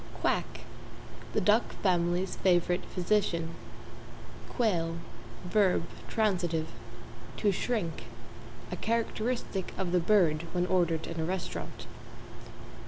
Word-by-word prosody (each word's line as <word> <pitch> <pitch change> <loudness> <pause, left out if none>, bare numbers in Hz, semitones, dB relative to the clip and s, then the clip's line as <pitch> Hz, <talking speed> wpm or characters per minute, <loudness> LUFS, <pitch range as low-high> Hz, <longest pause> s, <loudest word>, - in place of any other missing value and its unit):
=QUACK= - - 0 0.7
The - - +2
Duck 215 +3 +3
family's 175 0 +2
favorite 180 0 +3
physician. 175 -3 0 1.0
=QUAIL= 170 -8 +1 0.5
v. 190 0 +3 0.6
t., 165 -2 -1 0.7
To 205 - +3
shrink 195 -5 -2 0.7
a - - -1
characteristic 230 -3 -1
of 185 -2 -1
the 180 - +4
bird 170 -4 +3
when 180 0 +1
ordered 170 -3 +1
in 165 -1 -5
a - - 0
restaurant. 180 +2 -4
180 Hz, 100 wpm, -30 LUFS, 170-205 Hz, 1.0 s, the